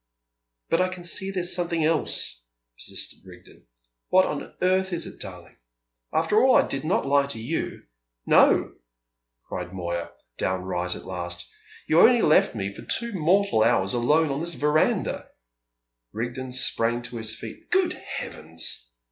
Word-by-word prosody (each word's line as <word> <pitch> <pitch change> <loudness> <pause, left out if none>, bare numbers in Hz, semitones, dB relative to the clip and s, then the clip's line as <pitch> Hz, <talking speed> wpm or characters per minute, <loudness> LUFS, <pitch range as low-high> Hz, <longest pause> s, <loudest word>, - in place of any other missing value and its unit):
"But 165 - +3
I 185 - +3
can 185 -1 -8
see 190 +2 0
there's 180 -2 -1
something 170 -2 0
else," 155 - 0 0.3
persisted - - -5
Rigden. - - -16 0.4
"What 185 0 +5
on - - -5
earth 190 +1 +2
is 170 - -2
it, - - -11
darling? 90 -3 -10 0.5
After 165 +7 +3
all 260 0 +6
I - - +5
did 135 - -4
not 155 0 +1
lie 140 0 +3
to 125 -5 -5
you!" 130 +9 -3 0.4
"No," - - +4 0.7
cried 90 0 -5
Moya, 85 -1 -3 0.3
downright 90 -1 -1
at - - -10
last; 90 -1 -5 0.4
"you 160 - +4
only 240 +3 +6
left 150 -5 +4
me 100 -2 -3
for - - -10
two 235 -1 -1
mortal 185 - +2
hours 95 -3 +3
alone 150 +6 +2
on 135 - -2
this 170 0 -4
verandah!" 150 +1 +1 0.8
Rigden 120 +3 -4
sprang 120 -1 +1
to 120 0 -7
his 110 -1 -5
feet. 330 - -10
"Good 365 -1 +2
heavens!" 80 - -5
140 Hz, 150 wpm, -25 LUFS, -, 0.8 s, all